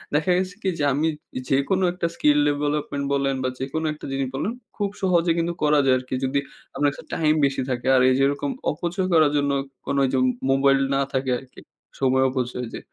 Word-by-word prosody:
দেখা 160 +4 +2
গেছে 185 0 -2
কি 190 - +1
যে, - - 0
আমি 155 +3 +1 0.3
যে - - -2
যেকোনো 140 +8 +1
একটা 175 -2 -1
skill 150 -1 +3
ডেভেলপমেন্ট 145 -1 -1
বলেন 135 -1 +1
বা, 130 - +1
যেকোনো 150 +4 -3
একটা 150 - -10
জিনিস 135 -1 -1
বলেন 205 +11 -1 0.2
খুব 205 -2 -1
সহজে 175 -3 +2
কিন্তু 170 +1 0
করা 150 0 +4
যায় 130 -1 +5
আরকি। 130 0 -5
যদি 135 +2 +1 0.4
আপনার 145 +1 +2
কাছে - - -12
টাইম 155 -1 +2
বেশি 135 -1 -1
থাকে। 125 0 -2
আর 130 - +5
এইযে 130 +1 +2
এরকম 145 - -2 0.2
অপচয় 175 +4 -2
করার 155 -3 +5
জন্য 140 0 +1 0.3
কোন 140 - -2
ওইযে 130 0 +1 0.3
মোবাইল 135 0 +4 0.2
না - - +2
থাকে 130 -1 0
আরকি। 130 -1 -16 0.4
সময় 130 0 +3
অপচয় 125 -1 -3
যে - - -5
140 Hz, 200 wpm, -23 LUFS, 135-160 Hz, 0.4 s, যায়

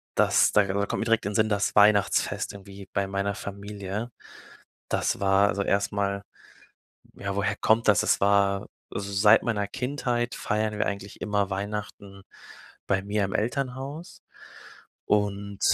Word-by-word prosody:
das - - +4
da 105 - +5
da 100 +1 -1
kommt - - -2
direkt 115 -3 +2
in 100 - -1
den - - -7
Sinn, 110 0 +3
das 100 -1 0
Weihnachtsfest 105 -1 +3
irgendwie 100 0 -11
bei 100 -1 +1
meiner 100 +1 -2
Familie. 100 +2 -6 0.8
Das - - 0
war, 100 0 +4
also 100 0 -1
erst 100 0 +1
mal, 100 -1 -1 0.9
ja, 100 -1 -4
woher 100 +1 0
kommt 110 +1 +2
das? 105 - +5
Das - - +2
war 100 -1 +2 0.2
also, 100 0 -4
seit 105 +2 +5
meiner 105 -4 0
Kindheit 125 -1 -2
feiern 105 0 -1
wir - - 0
eigentlich 100 0 -5
immer 100 -1 0
Weihnachten 100 0 -5 0.6
bei 95 0 +1
mir 100 +1 -1
im 95 +2 -4
Elternhaus 135 +7 -3 0.8
und 100 -1 -1
100 Hz, 150 wpm, -26 LUFS, 100-105 Hz, 0.9 s, da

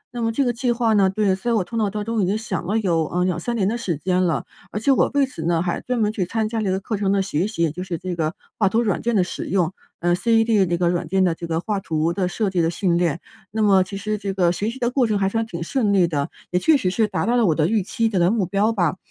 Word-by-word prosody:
那 240 - -3
么 225 - +1
这 275 +5 +1
个 245 - +1
计 245 +1 0
划 235 -2 +1
呢 195 -2 +4
对， 195 0 +1
所 215 +6 -2
以 - - +2
我 205 - +2
头 230 - -9
脑 215 -3 +1
当 210 +1 -4
中 230 -2 0
已 - - +2
经 205 +3 +1
想 190 -6 -4
了 210 - +1
有， 170 -7 +1
嗯， 180 0 +2
2，3 210 +6 -2
年 195 -4 +1
的 230 - 0
时 175 -9 -2
间 185 +3 0
了。 170 -3 0 0.3
而 210 - -3
且 250 +6 +2
我 270 - +3
为 285 -1 +4
此 255 -11 -8
呢， 170 -1 +2
还 175 -1 -2
专 250 0 -2
门 210 -1 +2
去 200 -4 -2
参 220 +4 -1
加 225 -1 -2
这 200 - -1
个 190 - 0
课 210 +2 -3
程 195 -1 0
的 195 -1 +2
学 180 0 -1
习， 215 -6 -2
也 160 - +1
就 180 +3 -6
是 180 -3 -4
这 180 +2 -4
个 160 0 -1 0.3
画 200 -3 +4
图 225 +4 +2
软 210 - 0
件 235 0 0
的 190 - +4
使 180 - -5
用， 180 -2 0 0.3
呃 175 0 +2
，ced 225 -2 +3
那 175 - 0
个 175 0 +1
软 175 -2 -1
件 190 +3 +2
的 175 -3 +2
这 170 +1 -7
个 165 0 -1
画 210 +1 -2
图 160 -2 -1
的 185 0 0
设 200 +1 -1
计 180 - +1
的 165 - +2
训 175 0 0
练。 170 -2 0 0.3
那 220 +2 -1
么 195 -2 +5
其 195 +2 -7
实 210 +1 -3
这 200 -1 -3
个 175 -2 +3
学 205 +5 -2
习 240 - -7
的 240 -2 0
过 255 -2 +2
程 210 -2 +1
还 195 - +1
算 225 +2 -1
挺 170 -5 -5
顺 210 +2 0
利 185 -3 +4
的， 145 -1 -2 0.2
也 180 - +2
确 310 +8 +4
实 185 -8 -1
是 220 +2 +1
达 210 - -2
到 240 - +1
了 235 -4 +3
我 160 - +2
的 155 0 +2
预 215 +1 +1
期 225 +4 -1
的 205 -4 0
的 175 +1 +4
目 210 -3 +1
标 200 +4 +1
吧。 185 -5 0
195 Hz, 340 characters per minute, -22 LUFS, 175-225 Hz, 0.3 s, 么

